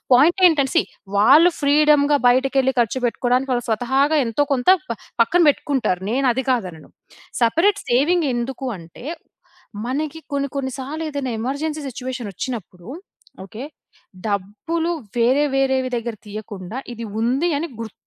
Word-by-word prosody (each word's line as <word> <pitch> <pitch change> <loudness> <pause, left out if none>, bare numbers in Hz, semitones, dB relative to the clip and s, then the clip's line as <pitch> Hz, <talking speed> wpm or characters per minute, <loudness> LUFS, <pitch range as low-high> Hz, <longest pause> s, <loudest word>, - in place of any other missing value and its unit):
పాయింటేంటంటే 315 -1 +4
see, - - +6 0.4
వాళ్ళు 290 - +7
ఫ్రీడమ్‌గా 290 0 +4
బయటికెళ్లి 265 +1 +2
ఖర్చు 235 +3 -1
పెట్టుకోడానికి 250 +2 0
వాళ్ళు 245 -1 -2
స్వతహాగా 265 +7 +1
ఎంతో 230 +5 0
కొంత 250 +2 +1 0.2
ప - - -1 0.3
పక్కన 345 +10 +3
పెట్టుకుంటారు. 265 - 0
నేనది 260 +1 +1
కాదనను. 185 -10 -3 0.5
సెపరేట్ 335 - +3
సేవింగ్ 305 +8 +3
ఎందుకు 250 +3 -4
అంటే, 165 +5 -13 0.8
మనకి 300 +5 -3
కొన్ని, 280 0 -1
కొన్ని 265 -1 -2
సార్లు 285 +5 -5
ఏదైనా 280 -4 -3
ఎమర్జెన్సీ 295 +6 -3
సిట్యుయేషనొచ్చినప్పుడు 235 -6 -6 0.6
ఓకే. 220 +6 -9 0.6
డబ్బులు 215 - -2 0.3
వేరే 255 +5 +3
వేరేవి 265 -1 +1
దగ్గర 235 -1 -4
తీయకుండా, 210 +1 -7
ఇది 230 0 -7 0.2
ఉంది 265 +9 +1
అని 330 +2 -4
గుర్ 225 -3 -6
260 Hz, 125 wpm, -21 LUFS, 230-290 Hz, 0.8 s, వాళ్ళు